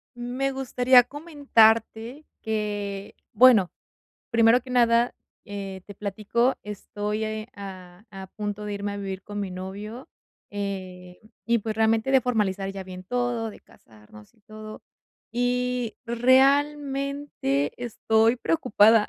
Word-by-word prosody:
Me 250 +3 -2
gustaría 255 -1 +4
comentarte 250 -3 +1 0.2
que 205 -2 -3 0.2
bueno, 220 -5 +6 0.6
primero 230 +1 +5
que 255 +1 -12
nada, 235 -1 +3 0.3
eh, 195 -2 -6
te 205 - -10
platico. 215 +5 0
Estoy, 210 +1 -4
eh, 215 +1 -4
a 185 -1 -10
a 190 -2 -9
punto 210 0 -5
de 210 -1 -4
irme 200 0 -3
a - - -5
vivir 195 -2 -5
con 205 0 -6
mi 195 -2 -3
novio, 200 +6 -7 0.4
eh, 185 -3 -6 0.3
y 235 0 +3
pues 220 0 -4
realmente 225 +3 +2
de 265 - +6
formalizar 200 -6 -1
ya 195 -1 -7
bien 185 0 -9
todo, 240 +1 -2
de - - -13
casarnos 105 -1 -18
y - - -30
todo. 215 0 -10 0.5
Y 245 0 -1
realmente 275 - +2
estoy 225 -1 +2
preocupada. 225 -7 +4
220 Hz, 125 wpm, -25 LUFS, 200-245 Hz, 0.6 s, bueno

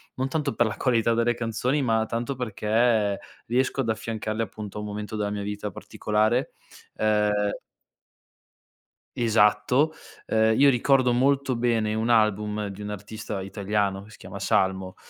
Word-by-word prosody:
non 130 +1 -1
tanto 150 -1 -1
per 120 - +3
la 105 -3 -3
qualità 115 -3 +2
delle 115 +1 +1
canzoni 120 +5 -1
ma 110 -2 +2
tanto 120 +4 -3
perché 110 -2 +1 0.3
riesco 130 +3 0
ad 115 - -2
affiancarle 110 0 -3
appunto 105 -2 -6
a - - -3
un 105 - -5
momento 105 +1 -5
della 105 -1 -1
mia 105 0 -3
vita 105 0 -4
particolare, 110 +6 -1 0.4
ehm 105 -1 +1 1.6
Esatto. 115 +6 +3 0.3
Ehm, 110 0 +2
io 140 0 +7
ricordo 130 0 +3
molto 135 +1 +2
bene 115 -3 +1
un 110 +2 -1
album 105 -2 +2
di 100 +1 -8
un 105 - -5
artista 105 0 -6
italiano, 100 0 -2
che 105 - -16
si 110 - -14
chiama - - -9
Salmo, 95 -1 0
110 Hz, 150 wpm, -25 LUFS, 105-120 Hz, 1.6 s, io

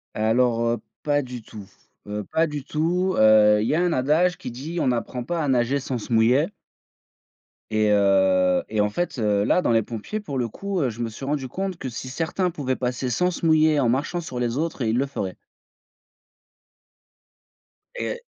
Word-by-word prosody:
Alors, 115 +2 +2
heu, 120 0 +1 0.3
pas 145 -1 +2
du 125 -3 -8
tout, 105 -3 -11 0.4
heu, 105 0 -4
pas 165 +1 +2
du 150 -3 -5
tout. 175 +6 0
Heu, 105 -1 +6
il 110 - 0
y - - +1
a 170 - +2
un 175 -2 +1
adage 155 +7 +2
qui - - -7
dit: 150 +8 -5
«On - - +1
n'apprend 125 0 -2
pas 165 +3 -2
à - - -1
nager 130 +1 +2
sans 130 -2 -4
se 120 - -9
mouiller». 120 +7 +4 1.2
Et 110 -1 +2
heu, 95 -2 +3
et 110 -1 +1
en 105 - +2
fait, 175 0 -3
heu, 105 -2 +2
là 180 - +3
dans 120 - +1
les 115 -2 +3
pompiers 120 - -5
pour 140 -11 -4
le 120 - 0
coup, 195 - -4
heu, 130 - +1
je 115 +2 -7
me 115 - -2
suis 110 +5 -10
rendu 140 -1 -2
compte 190 +4 -4
que 135 - -6
si 130 +2 -7
certains 170 +6 -1
pouvaient 135 -5 -2
passer 125 0 -2
sans 180 +10 +2
se 170 - -4
mouiller 155 -1 +4
en 120 -4 +2
marchant 155 +7 -1
sur 125 -6 -6
les 120 +1 -1
autres 160 -3 -2
et 110 - +1
ils 115 - +1
le 135 - +2
feraient. 100 -9 -4 2.6
Et 485 0 -4
130 Hz, 205 wpm, -24 LUFS, 110-160 Hz, 2.6 s, Heu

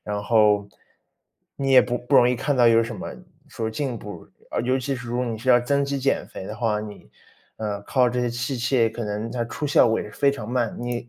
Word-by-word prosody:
然 105 -1 -4
后， 105 -2 +3 0.9
你 135 -1 -1
也 130 - +8
不 125 0 -2
不 125 - +1
容 120 - +6
易 125 - +2
看 140 +3 -1
到 120 - +5
有 115 0 +5
什 115 -1 -5
么 - - -7 0.3
说 110 -1 -4
进 120 0 -3
步， 105 - -10 0.4
尤 130 +2 +1
其 135 +1 -2
是 125 -1 -9
如 120 +1 -2
果 125 - 0
你 115 -2 -3
是 130 +4 0
要 120 -1 +6
增 140 +3 +1
肌 140 0 -2
减 135 +1 0
肥 - - -9
的 105 - -7
话， 110 -3 0
你， 105 -1 -10 0.5
呃， 105 -2 -4
靠 125 +3 +2
这 125 +1 -1
些 120 - 0
器 120 +2 -3
械 120 -2 +2
可 120 +1 -5
能 105 +2 -4
它 120 -2 -2
出 140 +5 -6
效 145 - +5
果 110 - +1
也 105 - -7
是 - - -18
非 140 - +3
常 115 -6 -7
慢。 120 -3 -1
你 120 0 -4
120 Hz, 265 characters per minute, -23 LUFS, 110-125 Hz, 0.9 s, 也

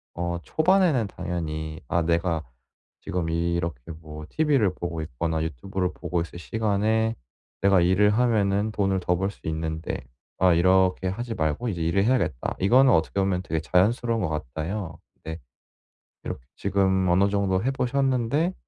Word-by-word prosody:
어 85 0 -2
초반에는 160 - +3
당연히 80 -4 -4
'아 85 - +1
내가 85 -1 0 0.6
지금 85 -2 -3
이렇게 85 -3 -1 0.2
뭐 75 -1 -9
TV를 140 - +2
보고 85 -2 -4
있거나 80 +2 -2
유튜브를 90 +5 -3
보고 90 - -3
있을 85 +1 -5
시간에 110 +3 0 0.5
내가 100 -1 +5
일을 95 +4 +4
하면은 105 -2 +2
돈을 95 -2 +1
더 90 0 +1
벌 95 +3 -1
수 - - -20
있는데. 80 0 -3 0.4
아 95 0 +4
이렇게 95 +2 +3
하지 115 +5 -3
말고 80 +9 -1
이제 90 -5 -3
일을 85 +4 +2
해야겠다.' 110 - 0
이거는 125 +7 +5
어떻게 85 +2 +2
보면 95 -2 0
되게 80 -3 -2
자연스러운 115 +7 +2
것 90 - 0
같아요. 80 - -4 0.2
네. 80 0 -5 0.9
비록 - - -5 0.2
지금 95 -1 +1
어느 95 +3 +4
정도 100 -2 +1
해 130 - +1
보셨는데 135 +5 0
95 Hz, 320 characters per minute, -25 LUFS, 85-110 Hz, 0.9 s, 내가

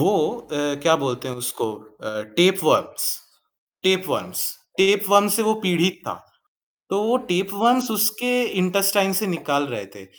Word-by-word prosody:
वो 195 - +3 0.3
अ, 145 -10 -3
क्या 160 -1 +4
बोलते 130 -2 -4
हैं 125 - -6
उसको 120 -2 -3
अ, 110 0 -9
टेपवर्म्स 190 +2 +3 0.7
टेपवर्म्स 185 0 0 0.4
टेपवर्म्स 200 +1 +4
से 225 - +1
वो 220 0 +2
पीड़ित 180 0 +1
था, - - -3 0.8
तो 200 +2 0
वो 235 +4 +2
टेपवर्म्स 215 +7 +1
उसके 215 +3 +1 0.3
इंटेस्टाइन 195 +1 +2
से 215 - -1
निकाल 145 -5 -1
रहे 105 -5 -5
थे, 100 -2 -13
190 Hz, 135 wpm, -22 LUFS, 145-205 Hz, 0.8 s, क्या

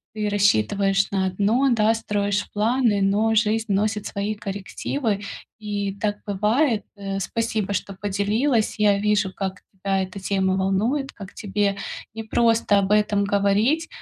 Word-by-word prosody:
ты 210 -1 -1
рассчитываешь 195 - +2
на 195 -1 +1
одно, 210 +8 +2
да, 220 -1 +3
строишь 205 -2 -1
планы, 220 0 +2
но 205 +3 +2
жизнь 220 +1 +2
вносит 210 +1 0
свои 205 +2 -3
коррективы. 205 +2 -3 0.4
И 205 -2 -3
так 205 0 -1
бывает. 215 +4 +1
Э, 195 -1 -4
спасибо, 215 -1 -2
что 195 +1 -3
поделилась. 210 +5 +1
Я 205 -1 +4
вижу, 210 -2 +1
как 190 -1 -4
тебя 195 0 -1
эта 190 +1 -5
тема 190 -1 0
волнует, 220 +9 0
как 195 -2 -10
тебе 200 -1 -1 0.4
непросто 225 -1 +2
об 195 0 -1
этом 210 -1 +3
говорить, 205 +11 +2
205 Hz, 135 wpm, -23 LUFS, 195-220 Hz, 0.4 s, Я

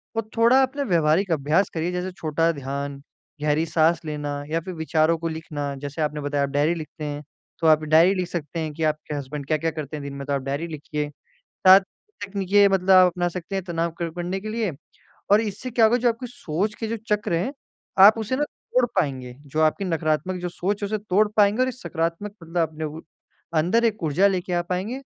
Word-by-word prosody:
और 225 -1 -2
थोड़ा 240 +4 +6
आप 265 +1 0
ना 285 - 0
व्यावहारिक 170 - +2
अभ्यास 160 +5 +2
करिए 165 +2 -1
जैसे 180 +1 -3
छोटा 165 -1 0
ध्यान, 140 -1 -5 0.4
गहरी 150 +2 +1
साँस 165 +1 +2
लेना 145 -2 -4
या 165 +1 0
फिर 185 +2 -7
विचारों 160 +1 +1
को 165 +1 -3
लिखना 150 -3 -4
जैसे 145 +3 -4
आपने 150 -1 -1
बताया 145 0 0
आप 140 - -1
डायरी 145 +4 +2
लिखते 155 -1 -8
हैं। 145 0 -5 0.4
तो 165 - +2
आप 155 -1 +5
डायरी 160 +5 +5
लिख 180 -2 -1
सकते 165 -2 -5
हैं 155 -2 -3
कि 160 +1 -4
आपके 155 -1 -1
हसबैंड 140 0 -5
क्या-क्या 160 +1 0
करते 155 -1 -6
हैं 145 - -7
दिन 140 0 -6
में 140 0 -6
तो 140 - 0
आप 140 - 0
डायरी 140 +5 -3
लिखिए। 150 -1 -4 0.6
साथ 190 +1 +10 0.5
तकनीकी 195 -1 -3
ये 205 0 +8
मतलब 195 -1 0
आप 185 -1 +8
अपना 175 0 -1
सकते 180 +2 -6
हैं 190 - -2
तनाव 170 -1 -1
क 165 -1 -2
करने 180 +2 -3
के 215 +2 -6
लिए 220 -4 -1 0.6
और 210 - +7
इससे 225 +3 -4
क्या 230 -1 +3
होगा 230 +3 +5
जो 245 0 +2
आपकी 230 +2 -2
सोच 205 -2 -3
के 225 - -1
जो 230 - -2 0.2
चक्र 205 -4 -2
हैं 185 +11 -1 0.5
आप 215 +3 +8
उसे 225 +4 -1
ना 295 - +1
तोड़ 255 -3 -1
पाएँगे, 130 -7 -1
जो 155 +3 -2
आपकी 155 +6 +2
नकारात्मक 165 +1 -1
जो 180 - -3
सोच 200 +4 -3
है 205 - 0
उसे 215 +1 -2
तोड़ 210 +1 +2
पाएँगे 210 +4 +4
और 255 - +2
एक 255 - -4
सकारात्मक 170 -2 -3
मतलब 165 +1 -4
अपने 155 0 -7
उ 155 +1 -5 0.6
अंदर 215 +9 +2
एक 215 -4 0
ऊर्जा 160 +6 +3
लेके 185 -2 -1
आ 175 0 +1
पाएँगे 185 +9 -3
170 Hz, 220 wpm, -24 LUFS, 155-200 Hz, 0.6 s, साथ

